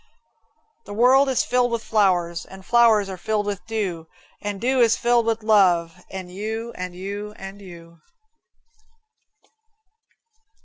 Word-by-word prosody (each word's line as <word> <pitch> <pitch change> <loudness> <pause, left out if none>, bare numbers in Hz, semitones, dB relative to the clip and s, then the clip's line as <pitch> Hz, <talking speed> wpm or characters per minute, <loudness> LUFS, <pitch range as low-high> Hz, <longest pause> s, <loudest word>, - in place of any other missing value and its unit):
The 205 - -8
world 260 +4 +5
is 260 - +1
filled 245 -1 +1
with 235 -1 -2
flowers, 175 -5 +1
And 190 0 -13
flowers 230 -4 +4
are 190 -2 -7
filled 215 -1 -1
with 205 -1 -4
dew, 190 -8 -3 0.3
And 205 -1 -4
dew 255 +4 +1
is 230 -2 +4
filled 240 -1 +2
with 225 -1 -1
love 180 -5 +2
And 185 -2 -7
you 220 +4 -5
and 180 -1 -6
you 200 +3 -6
and 195 +1 -9
you. 170 -3 -13
205 Hz, 135 wpm, -23 LUFS, 185-230 Hz, 0.3 s, world